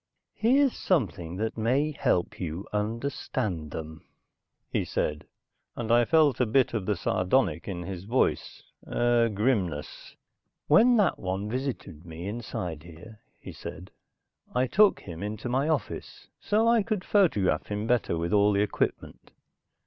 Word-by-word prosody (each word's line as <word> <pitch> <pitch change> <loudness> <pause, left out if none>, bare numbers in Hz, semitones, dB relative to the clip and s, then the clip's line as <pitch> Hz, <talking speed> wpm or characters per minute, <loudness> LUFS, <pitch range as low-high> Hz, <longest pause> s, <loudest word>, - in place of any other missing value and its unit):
"Here's 265 +4 +3
something 100 - -1
that 110 +3 -3
may 135 +7 +1
help 90 - 0
you 85 +2 -4
understand 105 - -2
them," 80 +1 -7 0.7
he - - 0
said, 75 0 -2 0.5
and 115 -1 -3
I 120 0 +5
felt 155 -5 +3
a 125 - +2
bit 125 +2 +2
of 105 -5 -2
the 105 - +1
sardonic 90 - 0
in 90 -3 -4
his 95 0 -6
voice, 120 +5 0 0.2
a 120 -1 +2
grimness. 100 - -2 0.5
"When 235 +11 +5
that 205 -4 +2
one 95 +3 -3
visited 125 - -4
me 85 +1 -8
inside 95 -7 -5
here," 85 +7 -13 0.2
he - - -9
said. 90 +4 -9 0.6
"I 125 +1 +3
took 205 - +4
him 85 -3 -8
into 105 +3 -4
my 135 +5 +1
office, 155 -3 -3
so 220 +2 +1
I 230 -1 +5
could 210 -2 -2
photograph 105 - +2
him 105 +1 -3
better 115 -7 +1
with 85 +3 -2
all 105 0 +4
the 100 - +2
equipment. 105 - -2
110 Hz, 145 wpm, -27 LUFS, 90-135 Hz, 0.7 s, I